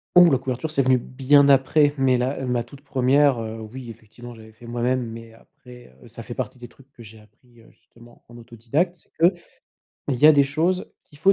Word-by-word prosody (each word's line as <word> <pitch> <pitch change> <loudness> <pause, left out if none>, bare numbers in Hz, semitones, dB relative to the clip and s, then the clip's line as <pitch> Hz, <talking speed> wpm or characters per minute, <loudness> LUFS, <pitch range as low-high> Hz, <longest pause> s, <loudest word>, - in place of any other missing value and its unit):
Ouh! 175 -3 +7
La 130 - +2
couverture 130 +4 -5
c'est 140 - +1
venu 130 -1 +3
bien 140 +3 +2
après 145 +2 +3
mais 130 -2 +2
la 130 +2 -3
ma 125 -1 -1
toute 135 +4 -16
1re, 135 -1 +2
heu, 110 0 -6
oui 120 +2 -10
effectivement 115 +2 -13
j'avais 110 -1 -15
fait 115 +2 -17
moi-même, 120 +1 -2
mais 115 0 -11
heu, - - -18
après 125 - -18
ça - - -11
fait - - -8
partie - - -6
des 120 -1 -11
trucs 135 +3 -23
que 120 - -15
j'ai 110 0 -14
appris, 115 +3 -24
heu, - - -21
justement 120 0 -21
en 120 0 -15
autodidacte, 120 +9 -3
c'est 170 +1 0 0.5
qu'il 140 - -6
y 150 - +7
a 155 - +8
des 140 -2 +4
choses 165 +7 -2 0.2
qu'il 145 - -19
faut 190 +5 +4
125 Hz, 215 wpm, -22 LUFS, 120-140 Hz, 0.5 s, a